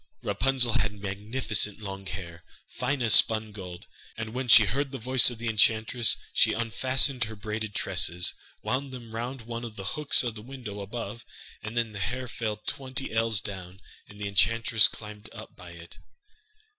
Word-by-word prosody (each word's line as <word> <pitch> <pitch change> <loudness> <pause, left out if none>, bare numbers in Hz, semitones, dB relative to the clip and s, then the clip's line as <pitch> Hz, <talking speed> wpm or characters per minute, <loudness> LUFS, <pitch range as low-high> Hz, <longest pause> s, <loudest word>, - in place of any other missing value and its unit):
Rapunzel 125 -2 +1
had 105 -1 0
magnificent 105 +1 -1
long 95 -2 -7
hair, 85 -2 -8 0.3
fine 140 -3 -2
as 115 -3 +5
spun 110 -1 +4
gold, 90 -4 -9 0.3
and 110 -1 -5
when 130 0 -3
she 110 -2 +8
heard 135 +7 -2
the 135 - -5
voice 130 +2 +5
of 120 - -8
the 115 +1 -5
enchantress 110 +1 +3 0.2
she - - +4
unfastened 130 +2 +2
her 110 0 -8
braided 105 0 -5
tresses, 90 -2 +1 0.3
wound 135 +2 -2
them 120 -3 -10
round 120 +2 -5
one 115 +1 -6
of 115 -2 -7
the 95 - -8
hooks 150 -3 +3
of 120 -2 -2
the 105 - -9
window 120 -4 -8
above, 115 +2 -6 0.4
and 110 +2 -7
then 115 -2 0
the 105 - -8
hair 125 +7 -3
fell 110 -2 -3
twenty 130 +4 -5
ells 115 -2 +2
down, 95 -2 -8 0.3
and 105 - -15
the 100 - -3
enchantress 110 +2 +4
climbed 105 0 -11
up - - -11
by 90 - -12
it. 85 0 -13
110 Hz, 175 wpm, -27 LUFS, 100-120 Hz, 0.4 s, she